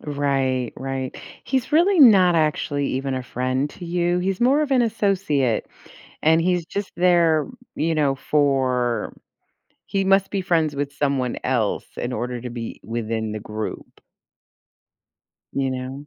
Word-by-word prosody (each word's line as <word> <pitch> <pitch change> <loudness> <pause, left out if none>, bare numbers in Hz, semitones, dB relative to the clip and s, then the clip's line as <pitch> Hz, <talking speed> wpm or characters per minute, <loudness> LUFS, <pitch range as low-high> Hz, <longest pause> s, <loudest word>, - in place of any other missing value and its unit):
Right. 135 -4 -1
Right. 135 -1 -4 0.3
He's 265 +1 -1
really 350 +4 +4
not 190 -9 +7
actually 145 -3 0
even 135 +1 -2
a 130 - -3
friend 130 +3 -2
to 175 - -10
you. 175 +1 0
He's 185 +1 -2
more 270 +5 +4
of 295 - -1
an 260 -2 +4
associate, 190 - 0 0.6
and 160 +1 +4
he's 175 -1 0
just 200 +4 -4
there, 170 -3 +3 0.3
you 165 +1 0
know, 145 -3 +2
for 130 -5 0 0.7
he 195 -1 -1
must 195 0 +3
be 195 -2 -1
friends 160 -5 +1
with 140 0 -2
someone 140 -3 -1
else 120 -5 0
in 120 +1 -3
order 125 +2 -3
to 125 - -5
be 115 -1 -6
within 110 -1 -3
the 110 - -5
group. 110 +1 -7 1.5
You 135 -1 0
know? 130 +2 -6
145 Hz, 145 wpm, -22 LUFS, 130-180 Hz, 1.5 s, not